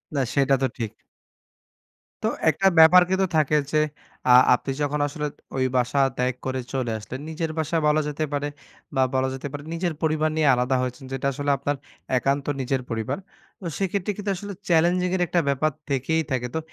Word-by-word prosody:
না 140 - +2
সেটা 135 -1 +3
তো 130 - +3
ঠিক। 110 -2 -4 1.3
তো - - +2 0.2
একটা 195 - +2
ব্যাপার 170 +3 +9
কিন্তু 190 0 +2
থাকে 150 0 +2 0.2
যে 155 - +2 0.5
আ - - +7 0.2
আপনি 135 +2 -1
যখন 145 0 0
আসলে 150 +1 -4 0.3
ওই 130 - +1
বাসা 125 +3 +1 0.2
ত্যাগ 125 +1 +1
করে 130 0 -1
চলে 130 -3 -1
আসলেন 120 +5 -7
নিজের 160 0 -3
বাসা 160 +1 0
বলা 150 +1 +3
যেতে 150 +1 -2
পারে 145 0 -1 0.5
বা 135 - +3
বলা 130 0 +2
যেতে 135 +1 -5
পারে 145 0 -6
নিজের 170 0 -1
পরিবার 155 -1 +1
নিয়ে 155 -2 +2
আলাদা 125 +2 +1
হয়েছেন 125 +2 -4
যেটা 135 +1 -1
আসলে 145 +1 -1
আপনার 145 +2 -1 0.4
একান্ত 140 +2 0 0.2
নিজের 130 +1 -1
পরিবার। 115 +4 -2 0.4
তো - - -8
সেক্ষেত্রে 195 +1 -1
কিন্তু 205 -1 -2
আসলে 205 +2 -6 0.2
চ্যালেঞ্জিং 175 +2 +3
এর 185 - -1
একটা 175 - +2
ব্যাপার 140 +3 +1 0.2
থেকেই 140 +4 +1
থাকে। 125 -1 0
তো 160 - +1
145 Hz, 185 wpm, -24 LUFS, 130-160 Hz, 1.3 s, ব্যাপার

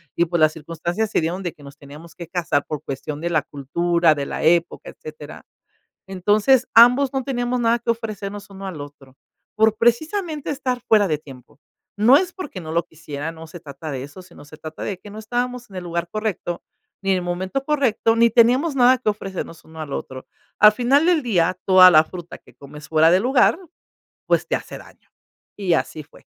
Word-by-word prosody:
y - - +3
pues, 170 0 -1
las 155 0 +4
circunstancias 170 +7 -4
se - - +2
dieron 170 +4 -3
de 175 - -3
que - - -21
nos 140 -1 -13
teníamos 150 +4 -13
que 170 - -9
casar 170 -5 -1
por 150 -2 -5
cuestión 140 +2 -6
de 170 +2 -3
la 160 -2 +2
cultura, 165 +4 +1
de 140 -1 -3
la - - -5
época, 170 +1 +1
etcétera. 155 -1 -11 0.7
Entonces, 210 +7 +2
ambos 250 +4 +6
no 270 - -1
teníamos 245 -2 -2
nada 235 0 +2
que 235 - -7
ofrecernos 205 -3 -6
uno 195 0 -10
al 185 -5 -6
otro, 140 -2 -12 0.4
por, 220 0 +3
precisamente, 305 - 0
estar 260 -3 -2
fuera 210 -2 +4
de 155 -5 0
tiempo. 135 -3 -15 0.4
No 225 +6 +6
es 350 +4 +2
porque 295 - -8
no 160 -1 -7
lo 170 +1 +1
quisiera, 160 -1 -7
no 160 0 -11
se 165 +2 -11
trata 150 0 -9
de 130 -2 -5
eso, 145 +6 -11
sino 180 -4 -16
se 145 - -13
trata 155 0 -9
de 190 -3 -4
que 205 - -12
no 210 +2 -9
estábamos 245 +2 -4
en 195 - -14
el 180 - -5
lugar 170 0 -3
correcto, 210 -4 -4 0.4
ni 195 - -3
en 190 - +2
el 180 - -3
momento 185 +9 -3
correcto, 255 -6 +1
ni 230 0 +4
teníamos 250 +7 +3
nada 255 -1 +4
que 220 - 0
ofrecernos 195 -5 -6
uno 160 0 -10
al 150 -2 -7
otro. 130 -1 -6 0.3
Al 210 0 +8
final 255 +7 +2
del 340 -4 +2
día, 185 -6 +1
toda 185 -1 +8
la 155 -1 +6
fruta 175 +1 -9
que - - -22
comes 150 +1 -12
fuera 160 +1 +4
de 180 - +4
lugar, 255 - +3 0.7
pues, - - +1
te - - 0
hace - - -7
daño, - - -19 0.4
y 190 -4 0
así 155 -1 -2
fue. 145 - -19
185 Hz, 205 wpm, -21 LUFS, 160-235 Hz, 0.7 s, Al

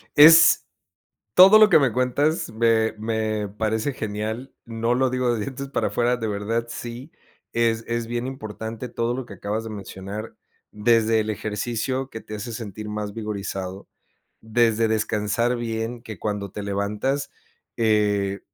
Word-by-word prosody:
Es 160 +2 +8 0.7
todo 195 - +9
lo 215 -1 +7
que 175 - +7
me 135 -4 +2
cuentas 130 +6 0
me 110 0 +2
me 110 -1 -2
parece 110 +5 -2
genial. 110 +3 -4
No 115 +1 -1
lo 130 +1 +2
digo 125 -1 0
de 115 - -2
dientes 135 +4 -5
para - - 0
afuera, 120 +1 +1
de 115 -2 -3
verdad 105 +3 -2
sí, 120 +5 -7 0.4
es 115 -1 +1
es 115 0 -2
bien 120 +1 -3
importante 110 -1 -6
todo 115 +1 -1
lo 130 -1 -5
que 105 - -10
acabas 105 +4 -3
de 115 - -7
mencionar, 100 +1 -7 0.4
desde 115 +1 +3
el 110 - -4
ejercicio 115 +5 -2
que 110 - -8
te 110 - -8
hace 105 +3 -6
sentir 110 -2 -6
más 105 -1 -4
vigorizado, 100 -3 -5 0.5
desde 115 0 +2
descansar 110 +2 0
bien, 115 0 -4
que 110 -5 -9
cuando 105 -1 -3
te 105 - -6
levantas, 105 +8 -2 0.5
eh, 105 -3 +1
115 Hz, 150 wpm, -24 LUFS, 105-120 Hz, 0.7 s, todo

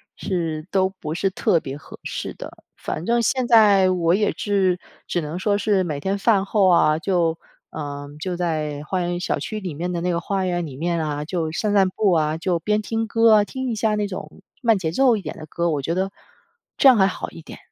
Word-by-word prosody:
是， 165 -4 -3
都 190 -1 +2
不 155 0 -4
是 195 +2 +1
特 190 -2 +2
别 135 -2 -7
合 - - -13
适 - - -5
的。 - - -10
反 165 - -5
正 235 0 +3
现 255 +2 +1
在 205 -5 +6
我 170 -2 +2
也 210 +1 +1
是 190 -3 +1 0.3
只 175 - -1
能 155 +2 -5
说 205 +1 +1
是 205 -2 +1
每 155 -5 -3
天 190 +7 -1
饭 200 -2 +3
后 200 -1 +3
啊， 155 -3 +4
就， 170 -2 +1 0.3
呃， 145 -2 -6
就 180 +3 -3
在 155 -4 -2
花 185 +4 -2
园- 175 0 -2
小 - - -1
区 215 - -4
里 185 -5 -5
面 175 +5 -3
的 170 -1 -2
那 180 +1 0
个 170 - 0
花 195 +1 -2
园 175 -1 -1
里 130 -3 -9
面 170 +1 -1
啊， 150 -1 -3
就 165 -1 -2
散 205 +5 -1
散 195 -2 +4
步 200 +1 +1
啊， 155 -1 +1
就 175 0 -1
边 210 +4 0
听 225 +1 -2
歌 225 +1 +4
啊， 210 - +5
听 260 +4 -4
一 - - -2
下 215 0 +1
那 210 -1 -1
种 190 0 -8 0.2
慢 230 -4 +3
节 160 -4 -2
奏 250 +5 +4
一 - - -5
点 155 - -6
的 155 - -8
歌， 170 +3 -1
我 145 -2 -1
觉 165 +5 -2
得 190 +1 -1 0.7
这 - - +6
样 255 - +7
还 190 -1 +5
好 185 - -5
一 165 - -11
点。 - - -11
180 Hz, 250 characters per minute, -22 LUFS, 160-205 Hz, 0.7 s, 样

